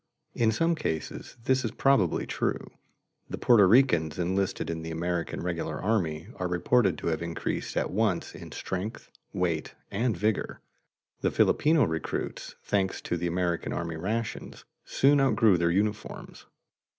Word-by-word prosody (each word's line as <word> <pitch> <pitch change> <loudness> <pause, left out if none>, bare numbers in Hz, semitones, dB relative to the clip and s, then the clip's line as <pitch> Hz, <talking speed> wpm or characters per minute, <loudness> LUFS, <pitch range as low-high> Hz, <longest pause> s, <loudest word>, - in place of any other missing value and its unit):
In 115 -2 +2
some 165 +9 +2
cases 100 - -4
this 130 +1 +2
is 115 - -1
probably 110 - +2
true. - - -2 0.6
The - - -4
Porto 115 -5 +6
Ricans 90 - +4
enlisted 95 +2 -1
in 80 -1 -3
the 80 - -6
American 85 +1 -2
regular 85 -3 -3
army 90 -5 -1
are 90 - -1
reported 90 +1 +2
to - - -5
have 80 -1 -1
increased 85 0 -3
at - - 0
once 105 -3 0
in - - -10
strength, 95 +4 -5 0.2
weight, 85 -4 -2 0.2
and 115 0 0
vigor; 105 +3 -1 0.6
the - - +1
Filipino 155 -1 +3
recruits, 80 -6 -3
thanks 95 -2 0
to - - -2
the 85 +1 -2
American 85 0 -1
army 85 -1 -3
rations, 105 +7 -4 0.2
soon 140 +1 +3
outgrew 110 -7 +4
their 85 0 +2
uniforms. 105 +4 -3
95 Hz, 145 wpm, -28 LUFS, 85-115 Hz, 0.6 s, Porto